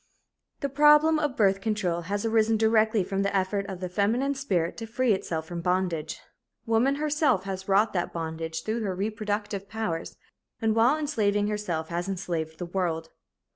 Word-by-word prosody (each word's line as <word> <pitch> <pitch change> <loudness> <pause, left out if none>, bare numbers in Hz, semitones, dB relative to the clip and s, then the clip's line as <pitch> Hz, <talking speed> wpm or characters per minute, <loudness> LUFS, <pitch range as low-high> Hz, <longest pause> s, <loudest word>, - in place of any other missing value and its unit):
The 280 - -1
problem 300 +3 +5
of 295 -4 -1
birth 195 -2 +3
control 190 -6 -1
has 205 +2 -1
arisen 225 0 +3
directly 220 -1 +3
from 195 +1 -2
the 200 0 0
effort 195 +1 -1
of 190 -2 -7
the 185 - -2
feminine 225 +9 +1
spirit 190 -12 -1
to 225 - -6
free 240 0 +2
itself 160 -4 -3
from 170 +1 -5
bondage. 180 -3 -1 0.5
Woman 230 +5 +2
herself 295 - +1
has 190 -1 -5
wrought 205 +3 +3
that 175 -2 -1
bondage 160 -1 -4
through 225 +2 -2
her 195 -4 -2
reproductive 205 -1 -3
powers 215 -7 -4 0.4
and 220 -1 +1
while 240 +6 +4
enslaving 210 -9 0
herself 175 -7 -3
has 175 +2 -3
enslaved 170 -4 -3
the 175 - -4
world. 170 -3 -2
205 Hz, 170 wpm, -27 LUFS, 180-225 Hz, 0.5 s, problem